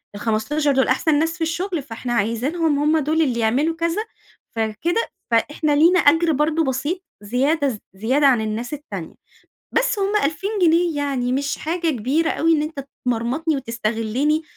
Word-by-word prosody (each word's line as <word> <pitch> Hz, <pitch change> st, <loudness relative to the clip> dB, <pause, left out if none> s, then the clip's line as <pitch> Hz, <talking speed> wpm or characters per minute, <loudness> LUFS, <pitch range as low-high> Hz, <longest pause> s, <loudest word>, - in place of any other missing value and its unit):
ال15 230 Hz, +8 st, 0 dB
دول 265 Hz, -1 st, +2 dB
أحسن 290 Hz, +3 st, +2 dB
ناس 325 Hz, +1 st, 0 dB
في -, -, -14 dB
الشغل، 340 Hz, 0 st, -2 dB
فإحنا 240 Hz, -1 st, -5 dB
عايزينهم 275 Hz, +8 st, 0 dB
هم 305 Hz, +2 st, +3 dB
دول 310 Hz, +2 st, +1 dB
اللي 255 Hz, -6 st, +1 dB
يعملوا 265 Hz, +9 st, +1 dB
كذا، 335 Hz, +4 st, -1 dB, 0.5 s
فكده 225 Hz, -, -1 dB, 0.2 s
فإحنا 295 Hz, +6 st, +1 dB
لينا 340 Hz, +5 st, +5 dB
أجر 325 Hz, +2 st, +4 dB
برضو 305 Hz, +3 st, +1 dB
بسيط 290 Hz, +7 st, -2 dB, 0.2 s
زيادة 275 Hz, +8 st, +1 dB
ز 225 Hz, -5 st, -5 dB
زيادة 255 Hz, +9 st, +2 dB
عن 250 Hz, -4 st, +4 dB
الناس 220 Hz, +4 st, -3 dB
التانية. 295 Hz, +1 st, -7 dB, 0.6 s
بس 475 Hz, -2 st, +1 dB
هم 395 Hz, +1 st, 0 dB
2000 320 Hz, +8 st, -1 dB
جنيه 335 Hz, -1 st, +3 dB
يعني، 270 Hz, -4 st, -1 dB
مش 280 Hz, +2 st, -1 dB
حاجة 335 Hz, +1 st, -1 dB
كبيرة 280 Hz, +6 st, 0 dB
أوي 330 Hz, +1 st, +2 dB
إن 300 Hz, -2 st, +2 dB
أنت 300 Hz, -3 st, -5 dB, 0.2 s
تمرمطني 255 Hz, +7 st, 0 dB
وتستغلني 235 Hz, +5 st, -1 dB
290 Hz, 155 wpm, -21 LUFS, 245-325 Hz, 0.6 s, لينا